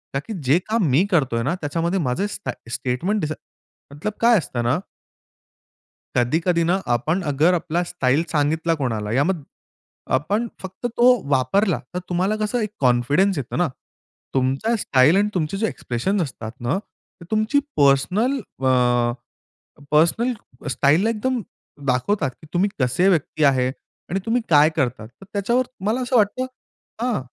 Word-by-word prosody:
ताकी 145 +11 -3
जे 135 +5 +4
काम 225 -1 +2
मी 165 +9 +4
करतोय 130 -8 +2
ना, 150 +6 0
त्याच्यामध्ये 170 +5 -1
माझं 145 +7 0
स्टाय 130 - -7
स्टेटमेंट 150 - -1
दिस 155 0 -2 0.6
मतलब 185 +9 -4
काय 235 -1 +6
असतं 120 -7 -4
ना 125 +5 +2 1.4
कधी-कधी 165 +8 +2
ना, 185 +3 +1
आपण 150 +10 0
अगर 160 +6 +3
आपला 170 0 -1
स्टाईल 145 -3 +1
सांगितला 160 +2 +1
कोणाला 110 -7 -2
या 135 +4 +3
मग 175 -4 -1 0.8
आपण 205 - -1
फक्त 190 +5 -8
तो 245 +1 +4
वापरला. 155 - +2
तर 180 - -2
तुम्हाला 185 +4 +1
कसं 215 +3 0
एक 215 - -1
कॉन्फिडन्स 140 +9 +2
येतो 130 - -4
ना. 175 -1 +2 0.7
तुमचा 135 - +1
स्टाईल 145 - +4
आणि 205 +1 +2
तुमचे 175 +1 -1
जे 220 +2 +1
एक्सप्रेशन 190 - -2
असतात 120 -8 -5
ना, 120 +9 0
ते 185 -3 -20
तुमची 215 +6 +2 0.2
पर्सनल 180 - +3 0.3
अ, 120 -2 +3 0.8
पर्सनल 170 +11 +3 0.4
स्टाईलला 145 - +3
एकदम 240 +2 -1 0.5
दाखवतात, 135 +5 +1
की 155 - -14
तुम्ही 190 +4 +2
कसे 130 +9 +2
व्यक्ती 155 -3 0
आहे. 130 -2 +3 0.4
आणि 190 - -1
तुम्ही 235 +2 +1
काय 150 0 +6
करतात? 130 -8 -2
तर 130 - -17
त्याच्यावर 235 +6 +1 0.2
मला 230 +5 +1
असं 250 +1 -1
वाटतं 225 +3 +2 0.6
हां. 245 - 0
165 Hz, 145 wpm, -22 LUFS, 130-205 Hz, 1.4 s, काय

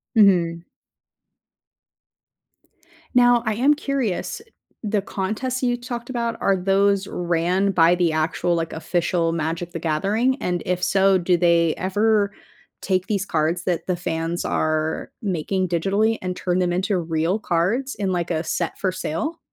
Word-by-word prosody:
Mhm. 175 -6 +4 2.5
Now, 245 -1 +5
I 220 - +1
am 275 +6 +4
curious. 275 - -2 0.4
The 210 -1 0
contests 220 +7 -3
that 255 - +1
you 245 0 +1
talked 240 0 -6
about, 235 -2 -2
are 195 - +3
those 195 +1 +2
ran 175 +3 0
by 170 -1 +4
the 175 -2 +1
actual, 160 +2 0
like, 165 -1 -2
official 170 0 0
Magic: 165 +1 -3
The 165 - -5
Gathering? 200 - +1
And 175 -1 -1
if 180 0 -1
so, 195 0 +4
do 180 0 +2
they 170 -2 +3
ever 205 +2 +1 0.5
take 185 0 0
these 200 -2 -1
cards 165 0 0
that 175 0 -2
the 180 - +1
fans 165 0 -3
are 155 0 -1
making 185 -1 -1
digitally 200 +6 +1
and 180 -1 -3
turn 180 0 -1
them 175 -1 +1
into 185 +2 0
real 165 +4 -1
cards 210 +9 0
in, 195 -3 -2
like, 175 -1 -1
a 160 -1 -1
set 170 +1 -2
for 190 - 0
sale? 185 - -3
185 Hz, 150 wpm, -22 LUFS, 170-210 Hz, 2.5 s, Now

